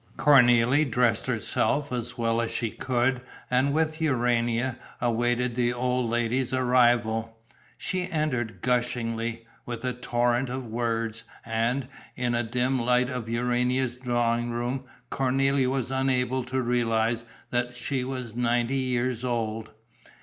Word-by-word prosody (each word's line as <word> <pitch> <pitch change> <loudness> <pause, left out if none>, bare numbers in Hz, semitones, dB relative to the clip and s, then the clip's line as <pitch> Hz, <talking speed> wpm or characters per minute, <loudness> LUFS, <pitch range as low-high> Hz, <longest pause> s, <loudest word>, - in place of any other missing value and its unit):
Cornélie 130 +1 +5
dressed 120 -2 +1
herself 145 -1 0
as 120 -1 -4
well 115 0 +1
as 115 - -1
she 115 -1 -2
could 125 0 0 0.3
and 130 +3 +3
with 155 +1 0
Urania 120 -3 +1 0.2
awaited 120 +1 +1
the 120 0 +1
old 125 -1 0
lady's 120 +2 0
arrival. 120 -3 +2 0.4
She 185 -1 -2
entered 125 - -1
gushingly, 115 -2 -1 0.2
with 120 0 -5
a 125 - 0
torrent 120 +1 0
of 130 0 -4
words; 115 -1 -2 0.2
and, 115 +3 0 0.3
in 125 -1 -1
the 120 0 +1
dim 125 +3 0
light 125 +2 +2
of 125 -3 -4
Urania's 125 +1 0
drawing 120 -1 0
room, 120 +3 -2 0.3
Cornélie 135 0 +2
was 130 -1 -2
unable 130 -1 +1
to 130 +1 -1
realize 115 -1 +1 0.3
that 120 0 -1
she 130 0 -2
was 125 -3 -5
ninety 120 +2 +1
years 125 -2 -1
old. 115 -3 -2
120 Hz, 130 wpm, -26 LUFS, 115-130 Hz, 0.4 s, Cornélie